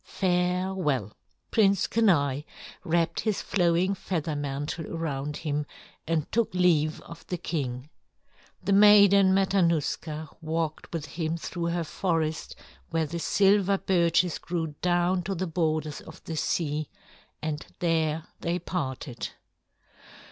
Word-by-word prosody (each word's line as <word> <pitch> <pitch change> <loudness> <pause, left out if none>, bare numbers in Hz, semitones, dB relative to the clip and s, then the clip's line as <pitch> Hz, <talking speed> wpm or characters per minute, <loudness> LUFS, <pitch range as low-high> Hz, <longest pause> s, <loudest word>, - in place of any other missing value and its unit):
Farewell." 180 - 0 0.4
Prince 200 -4 +4
Kenai 150 -12 +2 0.4
wrapped 165 0 +1
his 215 -3 -1
flowing 180 0 +2
feather 170 -5 -3
mantle 145 +3 -3
around 150 -3 -3
him 150 -1 -2 0.4
and 160 -2 +1
took 230 -1 +1
leave 160 -4 +3
of 165 -1 -11
the 180 - -2
king. 135 -6 -3 0.8
The 195 +2 +1
Maiden 200 -1 +7
Matanuska 170 -5 +1
walked 160 0 -3
with 165 -3 -3
him 160 +2 -3
through 170 +1 -4
her 170 0 0
forest 160 -2 -2 0.3
where 165 -1 0
the 170 +3 -4
silver 200 +2 +3
birches 175 -2 +2
grew 165 -3 -3
down 175 +1 +2
to 195 +2 -3
the 185 +2 -2
borders 155 -3 -1
of - - -13
the 160 - -5
sea, 155 -1 -1 0.5
and 155 -1 -3
there 160 -2 +1 0.2
they 170 +1 -1
parted. 140 -7 -4
165 Hz, 120 wpm, -27 LUFS, 155-185 Hz, 0.8 s, Maiden